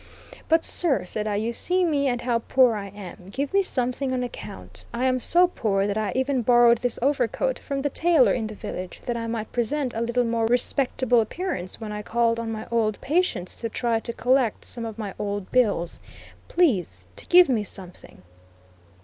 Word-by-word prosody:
"But 325 0 +3
sir," 310 - +2
said 210 +3 -3
I, 210 - -1
"you 220 +3 -1
see 365 +8 +1
me 285 -4 +1
and 245 -2 -1
how 240 -1 0
poor 250 +1 +3
I 200 -1 -5
am. 190 -2 -11
Give 275 - -3
me 395 - +5
something 260 -5 -1
on 255 -1 -1
account. 95 - -8
I 240 +2 -2
am 255 0 +2
so 350 +8 +6
poor 200 - 0
that 205 0 -1
I 215 -2 -1
even 260 0 +1
borrowed 240 -1 +5
this 245 -1 -1
overcoat 285 - 0
from 275 -1 -4
the 290 - +1
tailor 325 -5 +4
in 225 -3 -2
the 215 - -8
village, 185 -2 -7
that 240 - -2
I 230 -1 -3
might 225 -1 -4
present 255 +2 -1
a 225 - -3
little 235 +1 +1
more 230 -1 0
respectable 245 0 +2
appearance 225 - -4
when 220 -2 -6
I 210 0 -4
called 230 +1 +1
on 230 -1 -3
my 220 0 -5
old 220 -3 0
patients 300 - -1
to 230 - -3
try 230 0 0
to 235 - -5
collect 250 -1 +1
some 235 -1 -5
of 225 -2 -7
my 210 -3 -5
old 205 -2 -4
bills. 205 -9 +1 0.5
Please 180 - +1
to - - -8
give 360 0 +7
me 235 -6 +1
something." 180 - -8
235 Hz, 200 wpm, -24 LUFS, 215-265 Hz, 0.5 s, give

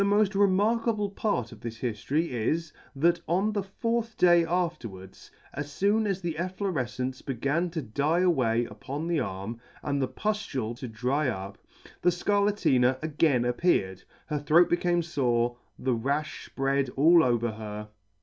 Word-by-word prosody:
Bat 200 - +3
the 205 - +3
moft 210 -1 +3
remarkable 205 +2 +2
part 200 - -1
of 110 - -13
this 115 -1 -6
hiftory 130 +8 -1
is, 155 +8 -1 0.2
that 170 +4 +2
on 195 +5 +1
the 205 - 0
fourth 230 +3 -2
day 175 -1 +6
afterwards, 155 - -4 0.2
as 145 0 -6
foon 210 +2 +3
as 195 -2 -1
the 170 -3 -3
effiorefcence 135 -9 -3
began 140 +7 -1
to 160 -3 -4
die 145 +9 +1
away 125 -10 +2
upon 135 +9 -6
the 170 -2 +1
arm, 100 0 -4 0.2
and 140 0 -1
the 130 - +1
puftule 145 - -2
to 130 - -5
dry 125 +6 0
up, 100 -3 -6 0.4
the 180 - +4
Scar 200 +4 +1
latina 130 -11 +3
again 150 -5 +2
appeared, 120 - +1 0.2
her 150 -2 -2
throat 155 +4 +4
became 175 0 +2
fore, 120 -7 0 0.2
the 130 -1 0
rafh 140 +6 -2
fpread 135 -1 +1
all 165 +4 +6
over 120 -2 +1
her. 105 -1 -7
150 Hz, 160 wpm, -28 LUFS, 120-180 Hz, 0.4 s, day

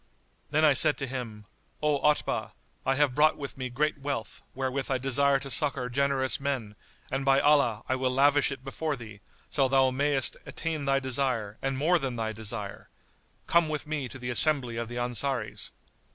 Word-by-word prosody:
Then 155 +2 +2
said 145 - +5
I - - -30
to 135 - -2
him, 120 -5 -6 0.4
"O 150 -2 +2
Otbah, 150 +1 0 0.3
I 135 - +3
have 145 -2 +2
brought 155 +3 +4
with 140 -1 -6
me 130 -1 -4
great 150 +4 -1
wealth, 135 -6 -4
wherewith 135 0 -2
I 135 - +1
desire 135 +2 +2
to 135 0 -7
succour 135 -3 -1
generous 135 0 +1
men; 130 -7 -3 0.4
and 135 +1 -1
by 135 0 +4
Allah, 140 -8 +3
I 130 - +1
will 130 0 0
lavish 140 +3 +3
it 135 -2 -7
before 150 +3 -3
thee,[FN#87] 110 -5 -11 0.3
so 135 -2 +3
thou 130 0 +3
mayst 140 0 +2
attain 160 -3 -4
thy 135 0 +2
desire 125 -5 -1
and 135 -1 -1
more 170 +5 +3
than 135 -4 -3
thy 110 -1 -2
desire! 110 -2 -5 0.6
Come 170 -2 +3
with 150 -1 -3
me 150 -4 -3
to 130 - -9
the 125 -1 -4
assembly 130 -3 +3
of 115 0 -3
the 120 +1 -7
Ansaris." 120 -1 -1
135 Hz, 185 wpm, -28 LUFS, 125-140 Hz, 0.6 s, said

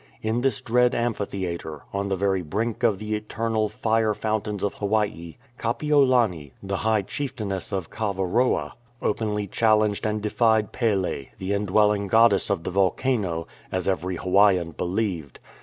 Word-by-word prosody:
In 110 +2 0
this 135 0 0
dread 125 0 +2
amphitheatre, 95 -9 -3
on 100 0 -1
the 95 - +1
very 95 0 +1
brink 110 +8 -2
of 115 -5 +3
the 105 +2 -4
eternal 110 0 -1
"Fire 110 0 +1
Fountains 105 -2 -2
of 100 - 0
Hawaii," 100 -6 -1 0.2
Kapiolani, 120 - +2
the 95 0 -2
high 110 -1 +1
chieftainess 110 -7 -4
of 95 -4 -3
Kaavaroa, 105 +3 0 0.3
openly 105 -1 -1
challenged 110 0 +2
and 105 0 -1
defied 110 0 +2
Pele, 95 - -1
the 95 +1 -2
indwelling 105 0 +2
goddess 110 -1 +4
of 95 -5 0
the - - -3
volcano, 95 -2 0 0.3
as 95 0 -2
every 90 -1 -1
Hawaiian 90 -1 +3
believed. 90 - -3
105 Hz, 140 wpm, -25 LUFS, 95-110 Hz, 0.3 s, goddess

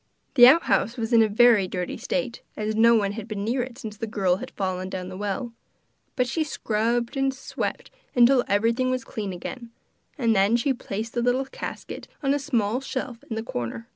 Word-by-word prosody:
The 245 -3 +9
outhouse 255 -5 +3
was 230 +1 -2
in 230 - +7
a 220 - +4
very 215 -2 +5
dirty 180 -1 -4
state, 255 -3 -3 0.2
as 215 0 -1
no 230 +1 +6
one 200 -3 +1
had 215 +1 -7
been 205 -3 -4
near 240 +4 0
it 245 -1 -6
since 220 -6 -8
the 225 - -4
girl 195 -5 +1
had - - -7
fallen 185 -1 -3
down 185 -1 -5
the 185 - -8
well; 205 +4 -3 0.6
but 250 - +2
she 315 +6 0
scrubbed 235 -3 -1
and 270 0 +1
swept 270 +1 -5 0.2
till 245 +1 +6
everything 230 +5 +2
was 255 0 -1
clean 215 -7 -5
again, 230 +7 -7 0.5
and 230 -5 +2
then 200 +4 +4
she 255 +3 +1
placed 225 -2 -5
the 240 - 0
little 250 +2 +1
casket - - -7 0.2
on 275 0 +2
a 290 - 0
small 245 -4 0
shelf 260 -3 -5
in 225 - -3
the 220 - -3
corner. 175 - -5
230 Hz, 200 wpm, -25 LUFS, 205-255 Hz, 0.6 s, The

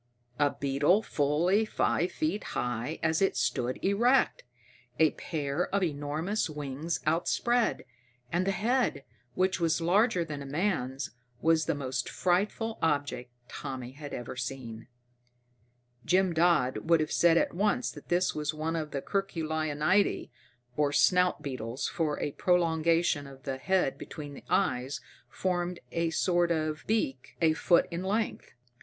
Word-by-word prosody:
_ - - +4
A 145 - +1
beetle 145 +9 +3
fully 165 +7 +2
five 185 -4 0
feet 310 -9 -1
high 125 +6 -2
as 160 +1 +2
it 195 - +2
stood 125 +1 0
erect, 235 +7 +3 0.5
a 160 -1 +5
pair 150 +1 -2
of 200 -1 0
enormous 160 +6 -1
wings 150 +2 -3
outspread. 220 +9 +1 0.5
And 180 +3 0
the - - +3
head, 230 - 0 0.3
which 185 +1 +1
was 165 -1 +2
larger 180 +1 +2
than 150 -3 -6
a - - -6
man's, 135 - -1 0.3
was 160 +1 +3
the 165 - 0
most 130 -3 -3
frightful 210 +5 0
object 145 -5 0 0.2
Tommy 130 -3 -6
had 145 +1 -9
ever 120 0 -6
seen. 125 -3 -6 1.2
Jim 185 -1 +2
Dodd 165 -3 +2
would 165 -1 +6
have 155 0 -1
said 170 -1 +4
at - - +1
once 210 +7 +1
that 145 - -12
this 180 +1 +2
was 150 0 -2
one 160 +2 -2
of 155 -2 -2
the 140 -2 -4
Curculionidae, 160 -1 0 0.4
or 145 0 +2
snout 180 +1 +3
beetles, 130 -2 -3
for 160 -4 -1
a 145 - -2
prolongation 165 -3 +2
of 135 -1 -13
the 135 -1 -4
head 180 -6 +1
between 145 -2 -8
the - - -12
eyes 125 +3 0 0.3
formed 180 -1 -2
a 165 0 0
sort 175 +1 +2
of 155 -2 -1
beak 135 - -1
a 160 -2 +4
foot 170 +2 +3
in 170 +1 -3
length. 210 +3 -2
160 Hz, 145 wpm, -29 LUFS, 145-180 Hz, 1.2 s, would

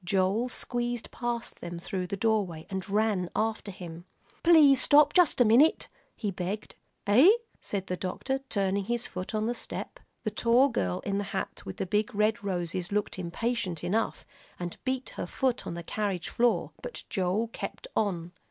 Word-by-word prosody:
Joel 195 +5 +1
squeezed 240 -1 -3
past 240 -1 -4
them 170 0 -5
through 180 +1 -3
the 200 - -3
doorway, 200 -7 0
and 190 0 -4
ran 205 -3 +1
after 220 -1 -1
him. 175 -3 -8 0.4
"Please 300 -6 +7
stop 290 +1 +6
just 355 -7 +5
a 245 - +6
minute," 245 +9 +5 0.3
he 210 -3 -2
begged. 190 +3 -4 0.3
"Hey?" 270 - +7 0.2
said 195 -2 -3
the 180 - -2
doctor, 265 +9 -2
turning 195 -1 0
his 240 +2 -1
foot 185 +4 -5
on 215 0 0
the 235 - 0
step. - - -6 0.2
The 215 - -1
tall 235 +5 +4
girl 90 - -1
in 200 0 -1
the - - -1
hat 195 0 -5
with - - -4
big 210 +2 +1
red 215 +2 +2
roses 180 -1 -2
looked 205 -2 -1
impatient 185 -1 -2
enough, 215 +6 -1 0.3
and 175 -1 -4
beat 260 0 -1
her - - -3
foot 260 -2 -1
on - - -4
the 170 - -6
carriage 195 -2 -2
floor, 240 0 +2
but - - -7
Joel 195 +5 0
kept - - -6
on. 175 -5 0
210 Hz, 170 wpm, -29 LUFS, 185-240 Hz, 0.4 s, Please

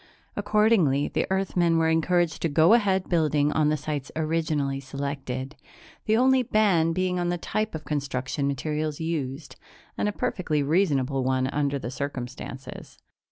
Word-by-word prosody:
Accordingly, 205 -9 +2
the - - -1
Earthmen 180 -3 +1
were 165 0 +2
encouraged 165 +1 +1
to 165 - +1
go 160 +7 +5
ahead 195 -5 +2
building 150 -4 +2
on 150 -1 +2
the 155 - +1
sites 145 -1 -4
originally 155 -3 -1
selected, 135 0 -5 0.5
the 220 +1 +3
only 260 +1 +4
ban 200 -8 +2
being 180 +1 0
on 175 0 0
the 175 - 0
type 215 +3 -2
of 155 - -7
construction 140 -1 -2
materials 150 +2 -2
used 140 -4 -4 0.4
and 210 - +1
a - - -1
perfectly 160 -7 -1
reasonable 140 -5 +1
one 130 0 +1
under 140 +1 -1
the 125 -2 -5
circumstances. 130 -1 -7
155 Hz, 150 wpm, -26 LUFS, 140-180 Hz, 0.5 s, go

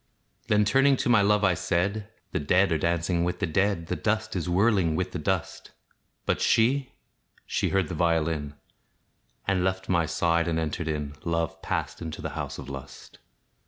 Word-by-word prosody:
Then, 105 0 +3
turning 135 +5 +4
to - - -1
my 115 -4 +6
love, 105 +1 +3
I 95 -2 +4
said, 100 +5 -1 0.2
"The - - -1
dead 90 +6 +3
are 80 - +3
dancing 85 +1 0
with 90 +1 -1
the 95 - 0
dead, 95 +1 0
The - - -2
dust 110 0 -1
is 90 -1 -2
whirling 95 -3 +3
with 90 +2 -2
the 90 - -4
dust." 95 0 -2 0.6
But - - 0
she 130 +4 +2 0.5
she - - 0
heard 95 -4 +1
the - - -5
violin, 80 -3 0 0.9
And 95 -2 +2
left 95 0 -1
my 85 -3 +2
side, 85 0 +1
and 80 -1 0
entered 80 +1 -2
in: 75 -2 -3
Love 85 -1 -2
passed - - -3
into 80 -2 -6
the - - -4
house - - -5
of 70 - -8
lust. 70 0 -10
90 Hz, 180 wpm, -27 LUFS, 80-100 Hz, 0.9 s, my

